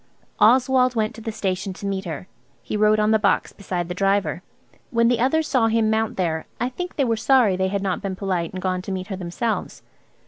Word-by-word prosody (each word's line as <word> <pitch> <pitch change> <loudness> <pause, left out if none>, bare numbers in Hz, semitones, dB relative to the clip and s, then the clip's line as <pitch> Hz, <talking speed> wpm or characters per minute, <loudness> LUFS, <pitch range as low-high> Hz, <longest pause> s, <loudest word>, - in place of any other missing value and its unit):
Oswald 250 +3 +4
went 215 -1 0
to 225 - -11
the 225 - -4
station 195 -2 -2
to 195 - -9
meet 195 -1 -2
her. 165 +1 -6 0.4
He - - -4
rode 215 0 +4
on 215 0 +3
the 220 - +4
box 200 -1 +1
beside 180 -3 -4
the 180 - -4
driver. 195 -2 0 0.5
When 235 -2 +3
the 245 -1 +2
others 300 +6 +2
saw 245 -5 +2
him 225 -1 +2
mount 220 0 0
there 160 -4 -1
I 245 +2 0
think 360 +8 -6
they 275 - +1
were 230 -2 +1
sorry 230 -3 +3
they 190 +1 0
had 200 +1 -2
not 190 -2 -1
been 195 -2 -3
polite 185 -4 -2
and 185 -1 -7
gone 185 -1 0
to 195 - -6
meet 185 +1 -4
her 195 - -3
themselves. 190 +6 -3
205 Hz, 230 wpm, -23 LUFS, 185-230 Hz, 0.5 s, Oswald